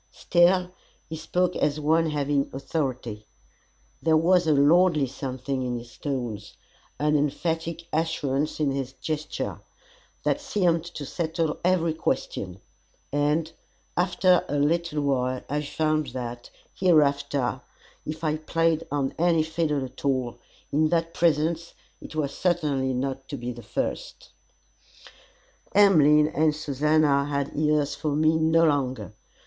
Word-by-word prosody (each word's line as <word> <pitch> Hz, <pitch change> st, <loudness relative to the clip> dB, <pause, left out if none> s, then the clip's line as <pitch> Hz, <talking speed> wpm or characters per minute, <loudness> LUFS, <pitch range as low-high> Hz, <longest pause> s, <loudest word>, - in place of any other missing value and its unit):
Still, 180 Hz, +1 st, +2 dB, 0.4 s
he 160 Hz, -, -6 dB
spoke 180 Hz, +3 st, -1 dB
as 150 Hz, 0 st, 0 dB
one 160 Hz, +2 st, +2 dB
having 145 Hz, -1 st, 0 dB
authority. 130 Hz, -6 st, -4 dB, 0.7 s
There 160 Hz, -1 st, +4 dB
was 175 Hz, +1 st, +3 dB
a -, -, +4 dB
lordly 155 Hz, +2 st, +4 dB
something 130 Hz, 0 st, -4 dB
in 125 Hz, -1 st, -2 dB
his 120 Hz, +1 st, -11 dB
tones, 120 Hz, -8 st, -5 dB, 0.4 s
an 150 Hz, +1 st, +1 dB
emphatic 160 Hz, +3 st, -1 dB
assurance 155 Hz, -3 st, -1 dB
in 145 Hz, -3 st, +1 dB
his 135 Hz, -1 st, -3 dB
gesture, 155 Hz, +2 st, -4 dB, 0.6 s
that 290 Hz, -, 0 dB
seemed 180 Hz, -, +1 dB
to 170 Hz, -4 st, -7 dB
settle 160 Hz, +1 st, -2 dB
every 170 Hz, -2 st, +2 dB
question; 95 Hz, -, -3 dB, 0.5 s
and, 150 Hz, +3 st, +1 dB, 0.4 s
after 180 Hz, 0 st, +3 dB
a -, -, -1 dB
little 155 Hz, +1 st, +1 dB
while, 130 Hz, -2 st, 0 dB
I 145 Hz, +2 st, -1 dB
found 155 Hz, 0 st, 0 dB
that, 120 Hz, -1 st, -6 dB, 0.2 s
hereafter, 140 Hz, -6 st, +2 dB, 0.4 s
if 155 Hz, +2 st, -6 dB
I 155 Hz, -1 st, +1 dB
played 165 Hz, +1 st, 0 dB
on 140 Hz, -2 st, -1 dB
any 165 Hz, -2 st, +3 dB
fiddle 155 Hz, -3 st, -1 dB
at 130 Hz, -, -12 dB
all, 130 Hz, -4 st, -1 dB, 0.3 s
in 155 Hz, +2 st, +2 dB
that 165 Hz, 0 st, 0 dB
presence, 165 Hz, +1 st, +1 dB, 0.3 s
it -, -, -10 dB
was 140 Hz, -3 st, -2 dB
certainly 150 Hz, -7 st, 0 dB
not 135 Hz, +1 st, -3 dB
to 140 Hz, -, -4 dB
be 120 Hz, 0 st, -4 dB
the 120 Hz, 0 st, -9 dB
first. -, -, -4 dB, 1.4 s
Emmeline 150 Hz, -7 st, +6 dB
and 155 Hz, 0 st, +1 dB
Susannah 150 Hz, -1 st, +2 dB
had 140 Hz, -1 st, -3 dB
ears 150 Hz, -1 st, +1 dB
for 150 Hz, -2 st, -2 dB
me 155 Hz, +1 st, +3 dB
no 160 Hz, +1 st, +4 dB
longer. 130 Hz, -, -1 dB
150 Hz, 130 wpm, -25 LUFS, 140-165 Hz, 1.4 s, Emmeline